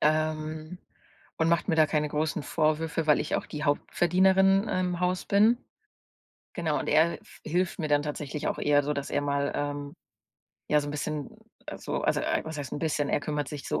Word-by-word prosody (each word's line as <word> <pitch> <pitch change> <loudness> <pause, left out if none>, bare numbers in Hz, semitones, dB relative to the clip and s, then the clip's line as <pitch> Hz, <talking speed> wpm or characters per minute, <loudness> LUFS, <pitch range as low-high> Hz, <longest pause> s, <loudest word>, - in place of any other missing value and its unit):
Ähm, 155 +2 -1 0.6
und 160 -1 +2
macht 170 +3 +1
mir 165 - +3
da 155 -1 +6
keine 150 0 0
großen 150 0 -1
Vorwürfe, 160 +2 0
weil 150 - +5
ich 150 - -2
auch - - -4
die 150 0 -5
Hauptverdienerin 190 +6 +3
im 180 -1 -1
Haus 180 0 0
bin. 215 +4 +4 0.9
Genau, 160 -4 -1
und - - -4
er 160 +3 +3
f - - -18
hilft 180 +3 0
mir 155 -4 -2
dann 145 0 +3
tatsächlich 150 0 -4
auch - - -2
eher 145 0 +3
so, 150 - 0
dass 140 -1 -4
er - - +1
mal, 140 0 0
ähm, 145 0 -3 0.7
ja, 150 - +4
so 145 - -5
'n - - -3
bisschen 150 -1 -3 0.4
also - - -4
also, - - +1
ei - - 0
was 160 -1 -6
heißt 140 -2 -6
'n - - -2
bisschen, 150 -3 0
er - - +1
kümmert 145 -1 -2
sich 145 -2 -7
so 75 - 0
155 Hz, 200 wpm, -28 LUFS, 145-170 Hz, 0.9 s, da